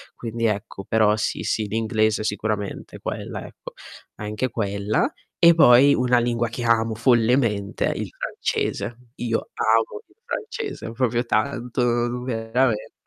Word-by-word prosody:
Quindi 115 0 -3
ecco, 100 -2 -2
però 110 -1 +3
sì, 105 - -2
sì, 110 -1 -1
l'inglese 110 0 +1
sicuramente, 105 -1 -3
quella, - - -5
ecco, - - -11 0.5
anche 105 +4 -2
quella. 100 -1 -1 0.3
E 170 -1 +7
poi 140 -3 +7
una 125 0 +3
lingua 120 0 0
che 120 +1 -5
amo 115 -1 +2
follemente 115 -3 +2
è - - -4
il - - -4
francese. 105 +4 -2 0.2
Io 115 -2 -2
amo 115 - +1
il - - -28
francese 430 - -5
proprio 120 0 0
tanto, 120 0 0
veramente. 115 -2 0
115 Hz, 130 wpm, -23 LUFS, 110-120 Hz, 0.5 s, E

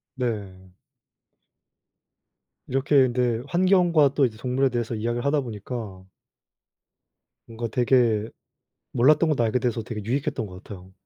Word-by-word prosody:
네. 100 -7 -4 2.0
이렇게 135 +3 0
근데 120 -2 0
환경과 175 -4 +3
또 140 - +4
이제 110 -3 -4
동물에 130 +3 0
대해서 120 -2 -3
이야기를 120 +3 -2
하다 145 +1 +2
보니까 110 -4 -7 1.4
뭔가 115 +1 -5
되게 120 -3 +2 0.6
몰랐던 150 +6 +4
것도 140 -6 +1
알게 115 +3 +1
돼서 120 -2 -2
되게 110 -1 -6
유익했던 130 0 -2
것 90 0 -12
같아요. 95 -2 -11
120 Hz, 270 characters per minute, -24 LUFS, 110-135 Hz, 2.0 s, 또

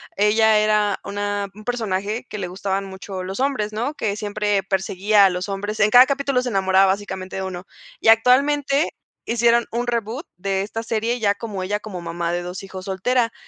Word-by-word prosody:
ella 215 +1 +4
era 210 -1 +1
una 205 0 -3
un 215 +1 -14
personaje 220 -1 -2
que 210 - -6
le 185 -3 -3
gustaban 195 +2 -3
mucho 190 -1 -7
los 190 +7 -4
hombres, 215 -7 -1
¿no?, 245 +7 -2
que 205 -2 -2
siempre 205 -1 -1
perseguía 195 +2 +2
a - - +5
los 180 +2 -4
hombres. 205 +2 -3
En 210 - +5
cada 245 +3 +8
capítulo 275 -2 0
se 250 - -4
enamoraba 190 -3 +3
básicamente 190 -1 -2
de 190 - -3
1 185 -1 -6 0.3
y - - -2
actualmente 275 +6 +4 0.3
hicieron 235 0 +3
un 240 +1 -1
reboot 235 - -3
de 195 +1 -1
esta 220 +3 -4
serie 230 +2 -1
ya 205 -2 +2
como 205 -4 -5
ella 205 +3 -2
como 195 -5 -7
mamá 170 0 -3
de 175 0 -1
2 180 +2 -7
hijos 190 -1 -8
soltera. 230 +5 0
205 Hz, 190 wpm, -22 LUFS, 190-230 Hz, 0.3 s, cada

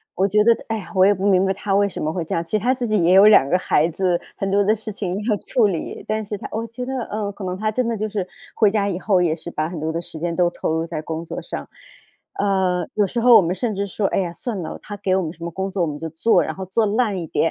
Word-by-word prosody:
我 190 - +2
觉 210 +2 +3
得 230 0 +5
哎 225 - -1
呀， 200 - -9
我 185 0 +6
也 205 - +5
不 195 0 -3
明 190 -1 +4
白 190 - +1
他 195 0 -2
为 200 0 +4
什 - - -6
么 155 - -1
会 175 0 -3
这 - - -4
样。 165 - 0
其 165 - -19
实 215 - +2
他 245 +5 +2
自 245 -2 -3
己 215 -3 +2
也 175 +2 +4
有 195 +2 +8
2 205 -10 +6
个 180 - +3
孩 165 -3 +2
子， 175 +1 0 0.2
很 195 - -2
多 200 +1 +3
的 210 +2 +3
事 220 0 -7
情 195 -4 -3
要 215 -3 +1
处 235 -5 +3
理。 180 -5 -4
但 215 0 -1
是 205 0 -5
他 - - -7
我 225 +1 -3
觉 240 +3 -6
得， 265 - -4
呃， 205 -1 -3
可 200 0 -10
能 185 0 -3
他 215 +2 -1
真 245 +2 -1
的 230 - -1
就 215 +1 -2
是 200 -3 -3 0.3
回 215 - +4
家 205 -1 +1
以 185 -1 -3
后 190 -3 +2
也 165 -3 +1
是 170 +1 -8
把 155 0 -2
很 170 -2 -6
多 155 +1 -2
的 165 +1 -3
时 165 -2 -10
间 170 +1 -2
都 175 -1 +3
投 175 - -3
入 160 0 -1
在 165 -2 -5
工 160 +1 -5
作 - - -6
上。 - - -7 0.6
呃， 190 -3 +1
有 205 -2 +2
时 235 +4 -2
候 240 0 +7
我 - - +6
们 180 +1 -1
甚 235 -1 -2
至 200 +1 -2
说： 195 +2 -1
“哎 - - +2
呀， 175 -3 -2
算 205 0 -4
了， 160 - -6
他 205 - -8
给 190 -2 0
我 190 - +2
们 160 - -4
什 170 - -23
么 170 - -3
工 190 +3 -3
作 190 -2 -2
我 165 - 0
们 145 - -4
就 160 +2 -5
做， 165 +9 +3
然 - - -4
后 190 - -6
做 205 +5 +1
烂 215 -1 +1
一 175 - -4
点， 165 - +1
195 Hz, 340 characters per minute, -21 LUFS, 175-215 Hz, 0.6 s, 有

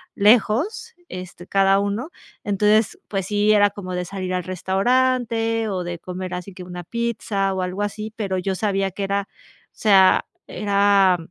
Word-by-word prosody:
lejos, 250 - +2
este, 180 -1 -8
cada 195 0 +3
uno. 205 +8 -2 0.3
Entonces, 210 +1 +2
pues 195 -3 -3
sí, 210 +1 +2
era 205 -1 +5
como 195 -2 -7
de 180 0 -2
salir 185 0 -4
al 180 0 -1
restaurante 225 +4 0
o 185 -3 -2
de 175 -1 -5
comer 185 +1 -6
así 180 +2 -6
que 185 - -8
una 180 0 -8
pizza 210 -2 -2
o 190 - -2
algo 185 +3 -2
así, 215 +1 -4
pero 195 -4 -2
yo 190 +1 -2
sabía 195 -1 0
que 195 +2 -5
era, 200 0 -1
o - - -27
sea, 195 -3 +4 0.2
era 200 -2 +3
200 Hz, 165 wpm, -22 LUFS, 185-215 Hz, 0.3 s, era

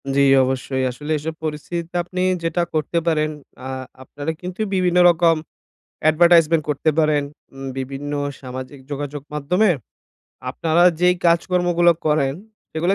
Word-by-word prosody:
জ্বী। 140 - +4 0.2
অবশ্যই। 130 0 -2
আসলে 145 +5 -7
এইসব 160 +2 -4
পরিস্থিতিতে 165 +3 -5
আপনি 180 +1 -4 0.2
যেটা 165 +1 0
করতে 155 +2 -1
পারেন, 155 -2 +2 0.4
আ - - -5 0.3
আপনারা 145 +4 -5
কিন্তু 180 +3 -6
বিভিন্ন 180 -1 +2
রকম 170 -1 +4 0.7
অ্যাডভার্টাইজমেন্ট 165 0 +5
করতে 150 +2 +1
পারেন, 150 -2 +2 0.3
উম 135 0 -7
বিভিন্ন 135 +2 -5 0.3
সামাজিক 130 +1 -8
যোগাযোগ 145 0 -4
মাধ্যমে 180 +9 +2 0.8
আপনারা 165 +1 +1 0.2
যেই 180 0 +4
কাজকর্মগুলো 175 0 +3
করেন, 145 -3 +2 0.4
সেগুলো 175 +4 +1
155 Hz, 125 wpm, -21 LUFS, 145-175 Hz, 0.8 s, অ্যাডভার্টাইজমেন্ট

